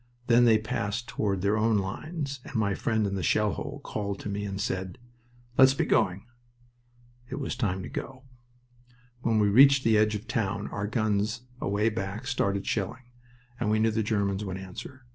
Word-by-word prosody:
Then 120 0 +5
they 110 -2 +6
passed 110 +1 -3
toward 100 -4 -1
their 100 +1 +3
own 110 0 +3
lines, 140 - -4
and - - -11
my 105 -3 +1
friend 110 +1 0
in 100 - -2
the 95 - -2
shell 105 +5 +2
hole 145 0 -6
called 100 -2 -4
to - - -5
me 100 +1 -3
and 100 -1 -4
said, 95 +1 -3 0.6
"Let's 130 0 +7
be - - +1
going." 95 +1 +1 1.0
It 135 - -4
was 135 -3 -3
time 95 -7 -1
to - - -6
go. 130 -1 -6 1.0
When 115 -2 +1
we 105 -1 +4
reached 135 +5 +7
the 110 -2 +4
edge 110 0 +2
of 105 - -3
the - - -22
town 100 -2 -1
our 105 0 -3
guns 110 +1 0 0.2
away 105 +3 +1
back 105 +2 -4
started 100 -6 0
shelling, 120 +5 -3 0.5
and 115 - 0
we 110 - +3
knew 110 +1 +3
the 110 +1 0
Germans 100 -2 0
would 95 -2 -4
answer. 95 +7 -9
105 Hz, 190 wpm, -28 LUFS, 100-120 Hz, 1.0 s, Let's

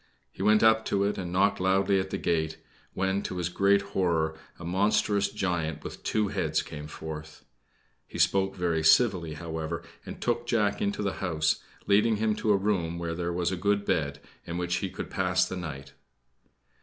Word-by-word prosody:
He - - -9
went 105 +2 +4
up 110 0 +5
to 100 0 +1
it 100 0 0
and 90 -2 -4
knocked 100 +3 +2
loudly 95 +1 +3
at 95 0 -3
the - - -2
gate, 80 -1 0 0.4
when, 95 +1 0
to 90 - -5
his 90 -1 -1
great 100 +2 +3
horror, 80 -4 +1 0.2
a 85 - -9
monstrous 100 +2 +2
giant 80 -7 -2
with - - -8
two 105 -2 0
heads 80 -6 0
came 75 -1 -8
forth. 80 0 -8 0.6
He - - -8
spoke 95 0 +2
very 85 -3 0
civilly, 85 -3 +4
however, 80 +1 -4 0.2
and - - -8
took 120 0 -1
Jack 105 -4 +1
into 100 +1 -1
the 100 - 0
house, 80 -4 +1 0.2
leading 105 +2 +4
him 110 +1 +1
to 110 - +1
a 100 - +5
room 95 -5 0
where 85 -1 -3
there 85 +1 -2
was 85 0 0
a - - -1
good 100 +3 +1
bed, 70 -5 0 0.2
in 85 - -5
which 90 0 0
he 95 - -2
could 90 - -7
pass 90 -1 +2
the 95 - -5
night. 70 -6 -7
90 Hz, 190 wpm, -28 LUFS, 80-100 Hz, 0.6 s, up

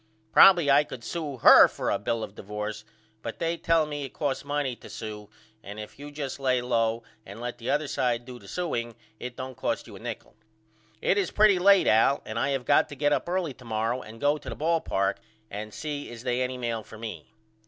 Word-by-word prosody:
Probily 175 -7 +7
I 145 +2 +6
could 125 -5 -9
sew 150 -3 -4
her - - +9
for - - -3
a - - 0
bill 115 -1 -2
of - - -7
divorce 105 +1 -5 0.4
but 115 - -6
they 165 0 -1
tell 165 -1 +2
me 145 -1 -5
it 135 - -7
costs 145 -3 -2
money 145 -3 -2
to - - -13
sew 105 -2 -7 0.3
and 105 +1 -9
if 105 +5 -9
you 145 +1 -8
just 145 -2 -5
lay 130 -2 +2
low 115 -2 0 0.2
and 100 +2 -10
let 120 0 -5
the 115 - -5
other 145 +1 +1
side 120 -4 -1
do 125 -1 -9
the 100 - -15
sewing 120 - -3 0.2
it 125 0 -6
don't 130 0 -5
cost - - -2
you - - -12
a - - -10
nichol. - - -7 0.7
It 200 - +3
is 190 - 0
pretty 210 -3 +4
late 195 +1 +6
Al 115 +6 +4
and 110 +1 -4
I 135 - +1
have 135 -3 -1
got - - +4
to 145 - -8
get 145 +1 +2
up - - -1
early 175 -5 -1
to 125 - -17
morrow 115 +2 -1
and 110 0 -11
go 145 +3 +2
to - - -8
the - - -5
ball 165 +1 +1
park 95 0 0 0.3
and 105 +2 -6
see 145 +3 -5
is 120 0 -9
they 125 0 0
any 130 0 -2
mail 115 -2 -2
for 110 +1 -13
me. 110 -1 -8
130 Hz, 230 wpm, -27 LUFS, 115-145 Hz, 0.7 s, her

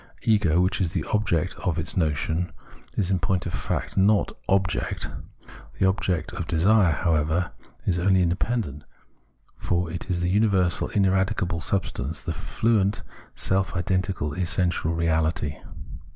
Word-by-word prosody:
Ego, 105 -7 +3
which 90 +2 +1
is 90 -2 0
the - - -1
object 95 -5 +1
of 85 -3 -1
its 80 - -3
notion, 80 +1 0 0.4
is 95 -2 0
in 95 - +2
point 95 0 0
of 85 - -4
fact - - -3
not 100 +2 +3
" - - -31
object." 95 -2 0 0.7
The - - +2
object 95 -3 -1
of 85 - -4
desire, 90 +2 +4
however, 80 +2 +1 0.3
is 90 -2 +1
only 95 +1 +3
independent, 90 - -1 0.7
for 85 -1 -1
it 85 +3 -6
is 90 -1 0
the 90 - +1
universal, 100 -4 +2
ineradicable 95 -3 +1
substance, 80 -5 -2
the - - -2
fluent 110 -3 0 0.3
self 95 0 0
identi 95 +1 0
cal 75 0 -2
essential 90 -1 0
reality. 80 -3 0
90 Hz, 140 wpm, -25 LUFS, 85-95 Hz, 0.7 s, desire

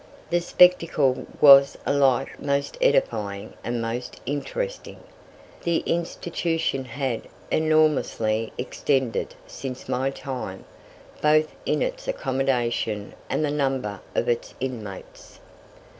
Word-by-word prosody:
The 175 0 +2
spectacle 165 -7 +4
was 140 -1 +8
alike 135 -2 +2
most 140 0 -1
edifying 105 - +1
and 120 0 -2
most 115 +2 -4
interesting. 485 - -4 0.6
The 170 -1 0
institution 165 -4 -1
had 130 -1 -3 0.2
enormously 150 -8 +2
extended 130 -2 -1
since 130 -1 -7
my 130 +2 0
time, 130 -8 -6 0.6
both 155 +1 +3
in - - +2
its - - -4
accommodation 125 - -1 0.2
and 155 - +1
the 145 - -1
number 135 -9 -1
of - - +1
its 120 -1 -1
inmates. 110 -7 -7
135 Hz, 100 wpm, -25 LUFS, 120-155 Hz, 0.6 s, was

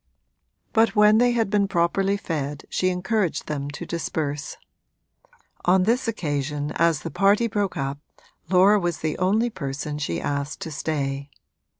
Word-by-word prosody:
But 225 0 +3
when 210 +1 +6
they 245 0 +4
had 225 -4 0
been 205 -2 +2
properly 195 +2 +1
fed 150 -6 -4
she 185 - +1
encouraged 185 0 -1
them 145 -2 -3
to 145 - -7
disperse; 155 -3 -3 1.1
on 185 +1 +4
this 235 +5 +1
occasion 145 -7 -2
as 165 -3 +2
the 165 - -5
party 200 +4 +3
broke 205 -4 -1
up 135 +1 -3 0.5
Laura 195 +3 +5
was 175 -3 -2
the 155 -1 -1
only 215 +6 +2
person 145 -1 -4
she 85 - -2
asked 140 +1 -3
to 160 - -5
stay. 140 -2 -3
170 Hz, 145 wpm, -24 LUFS, 145-205 Hz, 1.1 s, when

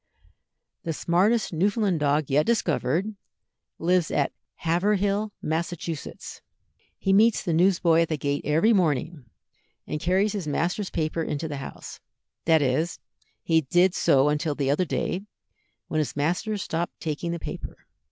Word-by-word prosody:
The 165 - -3
smartest 190 +7 +1
Newfoundland 195 +1 +1
dog 145 0 +1
yet 145 +3 +4
discovered 190 - 0 0.6
lives 175 0 +2
at 145 - 0 0.2
Haverhill, 200 +4 +1
Massachusetts. 165 -1 -4 0.6
He 195 - +1
meets 220 +3 +4
the 170 - -1
newsboy 170 -1 +4
at 165 - 0
the 155 - -1
gate 145 0 -1
every 160 +10 +3
morning, 160 - 0 0.6
and 150 - -4
carries 190 +4 +2
his 195 -7 -4
master's 180 +7 -1
paper 160 0 -2
into 155 0 -3
the 145 -2 -5
house; 135 - -8 0.5
that 160 -3 +4
is, 155 +6 0 0.5
he 160 -1 +3
did 175 +6 +3
so 150 -4 +3
till 150 -1 -2
the 140 -2 0
other 180 +6 +1
day, 180 +3 -2 0.7
when 155 - -1
his 150 - -2
master 175 +9 -1
stopped 170 -3 -3
taking 160 +2 -3
the 170 - -2
paper. - - -7
165 Hz, 140 wpm, -25 LUFS, 150-190 Hz, 0.7 s, yet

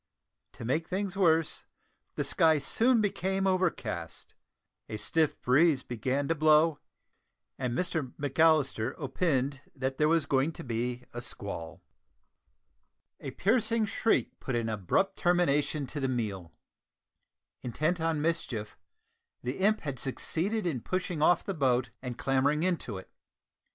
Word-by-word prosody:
To - - -8
make 155 +7 0
things 190 0 -2
worse, 165 -4 +2 0.5
the - - -1
sky 160 -2 +3
soon 230 - +3
became 195 -1 0
overcast, 170 - -2 0.6
a 110 - -4
stiff 160 +7 0
breeze 140 +2 +4
began 130 +4 -2
to 165 - +2
blow, 155 0 +4 0.8
and 125 -2 -2
Mr 160 -8 -1
McAllister 145 -4 +2
"opined" 140 -2 -1
that 135 -1 -3
there 150 - +4
was 165 -1 +3
going 140 +4 +1
to - - -8
be 120 +1 -3
a 120 - -5
squall. 100 -8 -6 1.4
A - - -6
piercing 225 +1 +1
shriek 220 +2 0
put 130 - -3
an 115 -1 -1
abrupt 110 - 0
termination 155 -4 +2
to 145 - -5
the 135 -1 0
meal! 100 -9 -3 1.1
Intent 155 +8 -1
on 160 -2 0
mischief; 125 -10 -2 0.6
the 125 +6 -3
imp 210 +3 +3
had 140 -4 -4
succeeded 185 - -1
in 145 -9 -1
pushing 180 -1 -2
off 175 +2 +4
the 195 - -3
boat 130 -6 +1
and 125 -2 -5
clambering 140 +4 +1
into 170 - -1
it. 95 - -11
150 Hz, 135 wpm, -30 LUFS, 125-175 Hz, 1.4 s, breeze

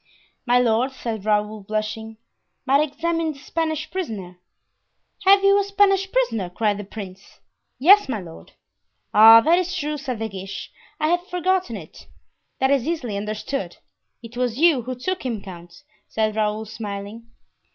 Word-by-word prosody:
"My 245 +1 +4
lord," 245 +2 +2
said 220 -5 -5
Raoul, 210 0 0
blushing, 215 +2 -4 0.5
"might 275 +2 +4
examine 325 +2 -1
the - - -16
Spanish 315 +1 -3
prisoner." 205 - -5 0.9
"Have 390 +1 +6
you 395 +1 +5
a - - +1
Spanish 390 -1 +2
prisoner?" 230 - 0
cried 205 +2 -1
the - - -5
prince. 195 -2 -10 0.4
"Yes, 385 +4 +6
my 230 -5 -2
lord." 165 -3 -12 0.6
"Ah, 225 +2 +9
that 335 +7 +4
is 365 0 -2
true," 300 +1 -2
said 260 -4 -4
De 225 +1 -3
Guiche; 195 -1 -8 0.3
"I 310 0 +1
had 350 +1 +2
forgotten 360 - -1
it." 160 -5 -13 0.5
"That 265 +1 +1
is 275 -2 +1
easily 280 -11 -2
understood; 210 0 -4 0.5
it 230 +1 -11
was 245 -1 -1
you 315 -4 +4
who 255 +2 -5
took 370 +10 -3
him, 240 -5 -3
count," 175 +4 -12 0.2
said 215 -1 -1
Raoul, 215 0 -1
smiling. 210 +1 -7
235 Hz, 155 wpm, -22 LUFS, 210-320 Hz, 0.9 s, Ah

